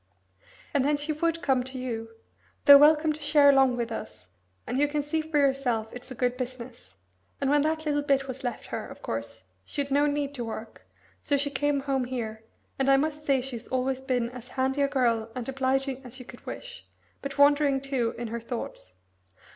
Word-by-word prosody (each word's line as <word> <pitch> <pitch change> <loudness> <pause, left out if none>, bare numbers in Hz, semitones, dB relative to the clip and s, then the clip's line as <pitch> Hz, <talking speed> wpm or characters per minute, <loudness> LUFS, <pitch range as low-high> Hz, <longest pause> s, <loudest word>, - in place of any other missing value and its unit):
"And 280 - +3
then 290 +1 +2
she 295 +2 -2
would 330 +2 -1
come 260 -3 +2
to 260 +1 -8
you 230 -3 -4 0.6
though 285 -1 +11
welcome 305 +1 +5
to 305 - -11
share 290 -1 +6
along 265 -2 +4
with 235 -1 -2
us, 215 - -7 0.3
and 255 - -2
you 290 - +4
can 295 0 -1
see 315 +2 -1
for 310 -1 -2
yourself 265 -6 +1
it's 245 +1 -9
a 255 - -7
good 250 0 0
business 245 - -7 0.4
and 275 0 +1
when 295 0 +4
that 315 +1 -1
little 290 -1 +1
bit 275 -1 +1
was 265 +1 -6
left 245 - -4
her, - - -3
of - - -12
course, - - -5 0.2
she'd 280 -1 -4
no 290 +2 +4
need 285 -1 -1
to 250 -4 -4
work, 225 0 -8 0.3
so 285 - +1
she 285 +1 -1
came 290 0 0
home 270 -2 0
here, 225 -3 -5 0.4
and 270 0 +2
I 270 - +6
must 300 +1 -2
say 270 -2 +3
she's 245 -3 -7
always 260 0 -1
been 250 -3 -1
as 250 -1 -10
handy 265 +2 -1
a 280 - +4
girl 235 -5 +1
and 245 -2 -4
obliging 270 0 -1
as 250 0 -10
you 255 - -10
could - - -14
wish, - - -8 0.3
but 275 +1 -6
wandering, 285 -1 +5
too, 265 -4 -1
in 235 -1 -4
her 235 +1 -3
thoughts. 225 - -6
270 Hz, 205 wpm, -27 LUFS, 250-290 Hz, 0.6 s, though